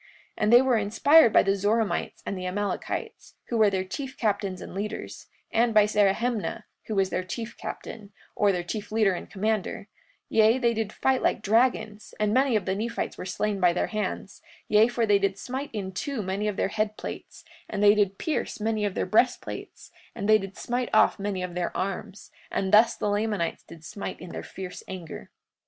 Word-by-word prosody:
43:44 - - -24 0.4
And 215 +2 +4
they 240 - +9
were 255 -3 +3
inspired 230 +6 +5
by - - +5
the 195 0 +2
Zoramites 205 -1 -1
and - - -3
the 185 -1 -4
Amalekites, 200 +1 -4
who 235 - 0
were 215 -2 +5
their 190 -1 -1
chief 265 +8 -6
captains 200 -4 -1
and - - -9
leaders, 205 +3 -5 0.2
and 230 0 +2
by 210 -1 +7
Zerahemnah, 210 +2 0 0.2
who 220 - -3
was 195 -1 +1
their 185 - -1
chief 230 +5 -6
captain, 210 -2 -8 0.2
or 205 -1 +3
their 180 -2 -2
chief 210 +4 -5
leader 215 -3 +3
and 175 - -6
commander; 210 0 -2 0.4
yea, 220 +2 +4
they 235 -2 +2
did 220 -2 -2
fight 265 +2 +1
like - - 0
dragons, 220 -1 +1
and 210 0 +1
many 260 -1 +3
of 205 -4 0
the 190 - 0
Nephites 230 +4 -3
were - - -7
slain 205 +2 -1
by 180 -2 +4
their 180 - 0
hands, 205 -2 -4 0.3
yea, 215 +2 +5
for 240 -1 0
they 205 -2 +4
did 195 -1 0
smite 265 +6 -5
in 195 -4 -4
two 225 +5 -3
many 195 +3 -2
of 210 - -1
their - - +1
head 215 +1 -1
plates, - - -8 0.2
and 205 - -2
they 205 0 +8
did 200 -2 +1
pierce 315 - -2
many 215 0 0
of 200 - -2
their - - 0
breastplates, 220 +6 -1 0.2
and 200 -2 -3
they 215 0 +6
did 195 -1 -8
smite 245 0 -2
off - - +4
many 195 -2 -2
of 180 -1 -5
their 175 0 -3
arms; 195 +1 -5 0.2
and 190 +1 -1
thus 220 +2 +6
the - - -2
Lamanites 205 -4 -1
did 165 -1 -14
smite 200 - -6
in 180 - -9
their - - -5
fierce 185 -1 -8
anger. 180 -4 -8
210 Hz, 205 wpm, -26 LUFS, 195-225 Hz, 0.4 s, they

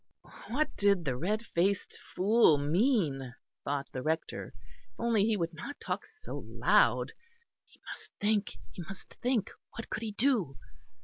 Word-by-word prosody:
What 300 +6 0
did 200 -4 +3
the 130 -3 0
red 210 - -1
faced 190 +2 0 0.2
fool 200 -4 +5
mean? 145 - +1 0.3
thought 140 -1 -1
the 130 - -4
Rector. 160 +3 -2 0.4
If - - -36
only 230 -3 +3
he 220 -1 +2
would 170 -2 -1
not 220 - -7
talk - - -3
so 435 -1 -8
loud! - - +3 0.6
He - - -24
must - - -8
think, 210 0 +1
he - - -7
must 190 +3 -10
think. 245 -5 +1 0.2
What 230 - -7
could - - -2
he 220 -2 -3
do? 220 - +1
200 Hz, 150 wpm, -31 LUFS, 160-225 Hz, 0.6 s, fool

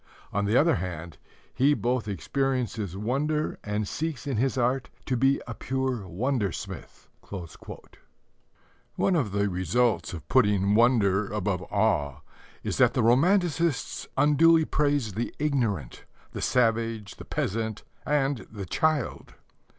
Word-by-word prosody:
On 100 +1 0
the 105 +4 +3
other 160 +2 +4
hand, 85 -2 -6 0.3
he 145 +3 +3
both 120 -3 -1
experiences 115 - -2
wonder 145 +8 -1
and 105 0 -2
seeks 155 -2 -4
in 135 -5 -2
his 130 +3 +1
art 125 +1 0 0.2
to 130 - 0
be 135 +3 +3
a 115 - -5
pure 130 -5 -2
wonder 110 +2 -1
smith." - - -8 1.9
One 190 - +2
of 130 - 0
the 100 +1 +1
results 100 +5 0
of 85 - -8
putting 105 -5 +3
wonder 105 -4 +3
above 100 -3 -1
awe 75 -10 +1 0.4
is - - -3
that - - +4
the - - +2
romanticists 165 - +2
unduly 160 +3 +5
praise 145 -9 0
the 115 +5 -3
ignorant 115 - -1 0.3
the - - -6
savage, 115 -3 0
the - - -9
peasant, 110 +1 -2 0.2
and 140 -3 0
the 100 -3 -6
child. 155 - -1
120 Hz, 130 wpm, -27 LUFS, 100-140 Hz, 1.9 s, unduly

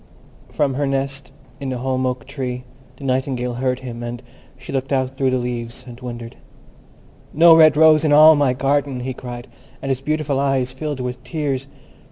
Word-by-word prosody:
From 140 -2 0
her 140 +2 -1
nest 135 0 -3 0.3
in 140 -1 -4
the 130 - -3
holm 130 +1 -1
oak 125 -2 -3
tree 130 -2 -5 0.3
the 140 - -12
Nightingale 130 -2 -1
heard 125 +1 -1
him, 120 -2 -7
and 120 +1 -6 0.3
she 135 +1 -9
looked 135 +1 -2
out 130 -1 0
through 135 -1 +1
the 130 - +1
leaves, 120 -1 -5
and 120 -1 -10
wondered. 120 -2 -7 1.0
"No 165 +2 +8
red 155 -2 +6
rose 155 -1 +6
in 155 - +2
all 155 +2 +8
my 140 -3 +2
garden!" 135 0 0
he 130 +1 -3
cried, 120 0 -8 0.3
and 135 - -5
his 130 -1 -2
beautiful 150 -1 -1
eyes 135 -2 0
filled 145 0 -4
with 125 0 -5
tears. 135 -2 -3
130 Hz, 185 wpm, -20 LUFS, 125-140 Hz, 1.0 s, No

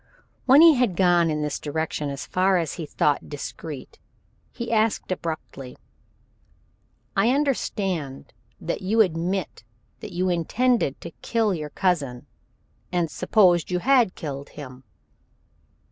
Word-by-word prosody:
When 270 +4 +8
he 330 -1 +9
had 245 -9 +1
gone 175 -2 +3
in 150 -1 -1
this 150 -1 -3
direction 150 -1 -3
as 140 -1 -5
far 185 +1 +2
as 165 -4 -2
he 160 - -6
thought 145 0 0
discreet, 145 -1 -8 0.5
he 235 -2 -5
asked 220 -3 +1
abruptly: 155 -7 -5 1.4
"I 195 +4 +3
understand 195 - -1 0.3
that 170 - -3
you 215 +4 +3
admit 180 - -1 0.4
that - - -8
you 180 +2 -1
intended 180 - +1
to 170 - -8
kill 225 -4 +1
your 155 -3 -4
cousin, 145 -10 -1 0.7
and 175 -3 0
supposed 180 -6 +3
you 180 - 0
had 245 0 +3
killed 140 -2 -6
him?" 130 -3 -9
175 Hz, 130 wpm, -24 LUFS, 150-210 Hz, 1.4 s, he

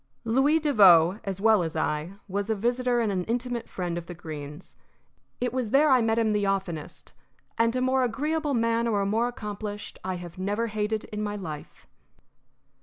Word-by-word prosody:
Louis 265 +7 +3
Devoe, 195 - +6
as 195 -1 -3
well 220 -1 +4
as 165 -2 -3
I, 155 +2 -1
was 200 +2 -3
a 220 - +2
visitor 240 +3 +1
and 220 -3 0
an 185 -2 -1
intimate 240 0 -3
friend 175 -2 -3
of 170 - -12
the 175 - -7
Greenes. 155 -1 -9 0.6
It 245 -1 -1
was 255 -4 -1
there 285 +5 +4
I 255 -2 +5
met 225 0 +1
him 225 -2 +2
the 205 -1 +1
oftenest, 190 -6 -4 0.4
and 230 +1 +2
a 255 - 0
more 260 0 +2
agreeable 295 +4 -1
man 230 0 +1
or 210 -3 +1
a - - 0
more 225 +4 +1
accomplished 210 -3 -6
I 185 0 -2
have 175 0 -9
never 205 +4 -1
hated 215 0 -2
in 210 0 -6
my 205 -1 -2
life. 160 -7 -8
210 Hz, 185 wpm, -27 LUFS, 185-240 Hz, 0.6 s, Devoe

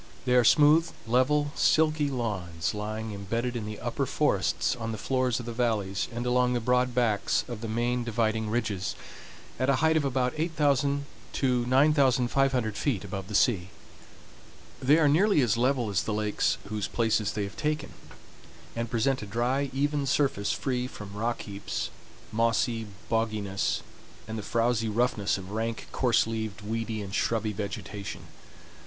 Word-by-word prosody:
They 125 - +2
are 125 -1 +6
smooth, 150 +7 +5 0.2
level, 140 +5 +2
silky 155 -2 +3
lawns, 95 -10 -2
lying 110 +1 -4
embedded 115 +5 -2
in 110 -3 -3
the 105 0 -6
upper - - -2
forests, - - +1
on 115 -2 -4
the 110 - -4
floors 130 +1 0
of 120 - -7
the 120 - -5
valleys, 105 -5 0
and 120 +1 -4
along 125 0 +2
the 120 - +1
broad 125 +1 +1
backs 115 -5 +1
of 120 -4 -6
the 115 - -4
main 120 +2 0
dividing 110 -1 0
ridges, 105 -5 -1 0.6
at 130 +1 +1
a 140 - +4
height 160 +4 +3
of 155 - +2
about 130 -2 0
8000 145 -3 +1 0.3
to 125 -3 +1
9500 130 -3 +3
feet 115 -8 -1
above 95 -1 -5
the 105 - -4
sea. 95 -5 +2 1.1
They 140 +4 +5
are 160 -2 +4
nearly 180 +5 +4
as 115 -4 +2
level 125 0 +1
as 90 -4 +1
the 110 - -2
lakes 105 -1 0
whose 105 -1 -2
places 110 -3 +1
they 105 - -2
have 100 - -6
taken, 150 0 -2 0.8
and 115 0 -2
present 125 +3 +1
a 105 - -6
dry, 125 +6 0
even 145 +1 0
surface 135 -7 +1
free 125 -2 -1
from 105 -5 -9
rock 115 +3 -2
heaps, 100 -1 -4 0.4
mossy 115 0 +1 0.2
bogginess, 110 -4 -1 0.5
and 110 - -5
the 110 - -3
frowsy 115 +1 +1
roughness 105 -3 +1
of 95 0 -9
rank, 115 +1 -3
coarse 125 -3 +3
leaved, 110 -2 -4
weedy, 110 0 -3
and 100 -1 -8
shrubby 110 -1 0
vegetation. 100 0 -5
115 Hz, 160 wpm, -28 LUFS, 105-130 Hz, 1.1 s, are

